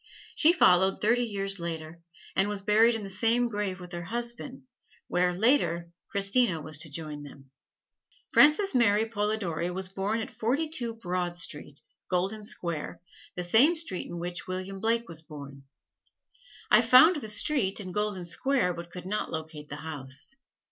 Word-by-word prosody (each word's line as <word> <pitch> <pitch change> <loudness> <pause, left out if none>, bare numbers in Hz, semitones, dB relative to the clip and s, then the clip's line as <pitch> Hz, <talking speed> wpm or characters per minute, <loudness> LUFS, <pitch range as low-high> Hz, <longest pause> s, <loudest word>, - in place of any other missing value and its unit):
She 320 - +5
followed 190 - +4
thirty 235 +3 +2
years 195 -3 -3
later, 165 -1 -6 0.3
and 195 +2 +2
was 205 -2 -3
buried 220 +3 +4
in 220 - -5
the 195 - -7
same 230 +5 +2
grave 205 -4 -3
with 180 -1 -11
her 175 -1 -6
husband, 240 +5 -5 0.4
where, 180 0 +1
later, 180 -5 +1 0.2
Christina 200 -2 +3
was 155 -1 -2
to 155 - -3
join 150 0 -6
them. 140 -2 -13 0.8
Frances 305 +6 +5
Mary 220 -4 +3
Polidori 205 -6 -2
was 185 +1 -3
born 195 +4 -2
at 220 - -5
Forty 270 +8 -1
two 240 -7 -3
Broad 180 -4 -3
Street, 150 -3 -3 0.3
Golden 190 +4 -1
Square, 170 -6 -5 0.4
the 180 - -2
same 240 - +5
street 315 - -1
in 175 - -7
which 175 +1 -5
William 185 +1 -5
Blake 230 +2 0
was 165 -1 -6
born. 140 -3 -11 1.1
I 215 - +7
found 255 +9 +7
the 220 -7 -5
street 210 -2 +1
and 185 -3 -7
Golden 210 -3 -1
Square, 180 +1 +1
but 170 0 -8
could 180 +1 -9
not 210 +3 -2
locate 160 -2 -7
the 150 - -6
house. 135 - -3
195 Hz, 160 wpm, -28 LUFS, 170-225 Hz, 1.1 s, I